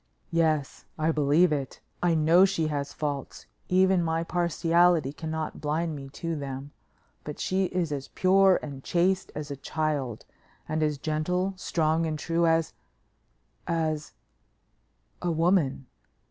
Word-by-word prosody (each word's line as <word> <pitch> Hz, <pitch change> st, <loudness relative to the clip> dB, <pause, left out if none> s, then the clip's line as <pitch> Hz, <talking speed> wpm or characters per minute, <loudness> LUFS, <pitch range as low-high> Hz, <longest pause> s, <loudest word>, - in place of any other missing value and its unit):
"Yes, 155 Hz, -4 st, 0 dB
I 155 Hz, +1 st, +1 dB
believe 155 Hz, +3 st, +3 dB
it. 140 Hz, -3 st, -4 dB, 0.2 s
I 175 Hz, -2 st, +3 dB
know 165 Hz, +4 st, +5 dB
she 195 Hz, -4 st, +2 dB
has 145 Hz, -1 st, -3 dB
faults; 145 Hz, -3 st, -4 dB, 0.2 s
even 185 Hz, 0 st, +4 dB
my 165 Hz, 0 st, 0 dB
partiality 170 Hz, -3 st, +2 dB
cannot 160 Hz, 0 st, -5 dB
blind 155 Hz, +2 st, -1 dB
me 135 Hz, -1 st, -8 dB
to 165 Hz, -1 st, -3 dB
them, 140 Hz, -1 st, -6 dB, 0.5 s
but 150 Hz, -, -7 dB
she 190 Hz, +1 st, +1 dB
is 180 Hz, -3 st, -2 dB
as 140 Hz, -2 st, -4 dB
pure 190 Hz, 0 st, +4 dB
and 140 Hz, -3 st, -7 dB
chaste 185 Hz, +2 st, +1 dB
as 150 Hz, -1 st, -5 dB
a -, -, -3 dB
child, 140 Hz, -5 st, -3 dB, 0.4 s
and 155 Hz, 0 st, -1 dB
as 150 Hz, -1 st, +1 dB
gentle, 180 Hz, +6 st, -1 dB
strong 165 Hz, -2 st, 0 dB
and 155 Hz, -1 st, -2 dB
true 170 Hz, +2 st, +1 dB
as 165 Hz, 0 st, +2 dB, 0.9 s
as 155 Hz, -2 st, -1 dB, 1.1 s
a 175 Hz, -, -1 dB
woman. 165 Hz, -5 st, +1 dB
160 Hz, 135 wpm, -27 LUFS, 150-175 Hz, 1.1 s, know